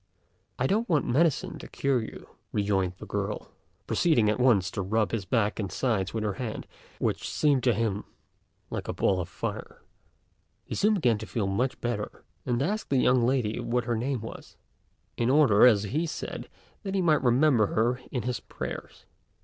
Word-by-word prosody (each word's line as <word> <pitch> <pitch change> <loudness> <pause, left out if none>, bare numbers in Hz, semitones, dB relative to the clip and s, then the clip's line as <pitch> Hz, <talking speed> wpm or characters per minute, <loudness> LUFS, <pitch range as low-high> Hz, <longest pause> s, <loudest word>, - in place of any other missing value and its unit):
"I 125 - 0
don't 220 - +1
want 155 -5 +2
medicine 150 +4 +1
to - - -9
cure 135 -3 0
you 110 - -8
with," - - -26 0.2
rejoined 100 -3 +1
the - - -9
girl, - - -4 0.3
proceeding 120 -11 +3
at 110 - -2
once 110 -8 +3
to 100 - -3
rub 105 +2 0
his 110 -5 -2
back 110 0 +1
and 100 -3 -3
sides 105 -7 0
with 110 -1 -2
her 105 -2 -1
hand, 115 -4 -4 0.3
which - - -1
seemed 145 -4 +2
to 120 - +5
him 105 -2 -1 0.7
like - - -4
a - - -2
ball 95 -2 +1
of 85 - -6
fire. - - -6 0.8
He - - -6
soon 215 +1 +3
began 120 - +2
to 110 - -7
feel 110 -4 -1
much 115 +7 -1
better, 120 -4 -3 0.2
and 120 +1 +1
asked 210 +7 -2
the 135 - +2
young 125 -1 +4
lady 125 -5 0
what 120 0 -1
her 120 - 0
name 125 +1 -1
was, 115 - -10 0.6
in 120 +1 +1
order, 130 -6 +6
as 105 -4 +4
he 150 - -1
said, - - -6 0.3
that 195 -1 -4
he 190 - +2
might 155 -3 +4
remember 125 -3 +4
her 120 +5 0
in 125 - -3
his 125 -2 -2
prayers. - - -7
120 Hz, 190 wpm, -28 LUFS, 105-135 Hz, 0.8 s, order